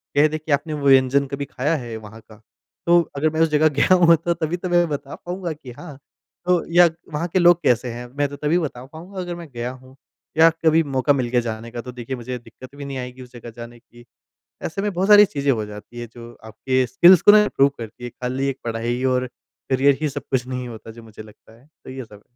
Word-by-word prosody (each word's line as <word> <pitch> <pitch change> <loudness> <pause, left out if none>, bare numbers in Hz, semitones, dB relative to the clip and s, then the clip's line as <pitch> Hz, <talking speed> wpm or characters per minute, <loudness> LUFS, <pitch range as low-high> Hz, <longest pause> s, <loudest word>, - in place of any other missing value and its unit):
कह 145 +2 +5
दे 155 +1 -3
कि 155 0 -7
आपने 150 +2 0
वो 140 -2 -2
व्यंजन 135 +1 +4
कभी 140 +1 -4
खाया 145 +5 -1
है 120 -6 -6
वहाँ 110 +1 -12
का, 110 0 -18 0.4
तो 175 0 +5
अगर 150 +3 +1
मैं 160 +1 -4
उसे 165 - +4
जगह 155 +1 +4
गया 185 - +5
हूँ 170 0 +7 0.2
तभी 165 +1 -3
तो 180 0 -5
मैं 175 -1 +3
बता 140 -1 -5
पाऊँगा 180 -1 -5
कि 140 -5 -12
हाँ। 145 +2 -11 0.5
तो 180 -2 +2
या 175 0 +7 0.3
वहाँ 155 +4 -2
के 185 - +3
लोग 175 -1 +5
कैसे 125 +1 +2
हैं 120 +1 -8
मैं 145 - +1
तो 145 - -8
तभी 150 +4 0
बता 130 -6 -5
पाऊँगा 175 +7 -10
अगर 175 -1 -5
मैं 170 -2 -9
गया 120 +1 -4
हूँ 130 +1 -15 0.4
या 165 +1 +7 0.2
कभी 160 +1 +5
मौका 135 0 +1
मिल 130 -3 -1
गया 120 0 +2
जाने 115 0 -6
का। 120 -1 -5
तो 125 - -9
देखिए 125 +1 -6
मुझे 125 +1 -6
दिक्कत 130 +3 -14
भी 140 0 -8
नहीं 135 -1 -5
आएगी 125 0 -7
उस 125 -1 -13
जगह 120 -1 -10
जाने 120 0 -10
की। 120 +1 -19 0.6
ऐसे 195 +5 -3
में 205 -1 -1
बहुत 185 +3 -1
सारी 210 0 +9
चीजें 140 -6 -1
हो 110 -5 0
जाती 105 +3 -10
है 120 - -6
जो 120 -1 -11
आपके 130 +4 -1
स्किल्स 170 +8 +6
को 205 - +8
ना 210 0 +7
ग्रो 140 -6 +3
करती 115 +1 -9
है। 120 - -5
खाली 130 +3 -3
एक 135 - -3
पढ़ाई 120 +2 -2
और 125 0 0 0.4
करियर 135 +1 +3
ही 155 - 0
सब 145 +1 -6
कुछ 125 -2 0
नहीं 125 -1 -5
होता 115 -1 -10
जो 115 +1 -12
मुझे 110 -1 -12
लगता 110 +1 -18
है। 135 - -24 0.2
तो - - -9
ये 130 0 -7
सब। 105 -2 -16
135 Hz, 245 wpm, -21 LUFS, 120-160 Hz, 0.6 s, सारी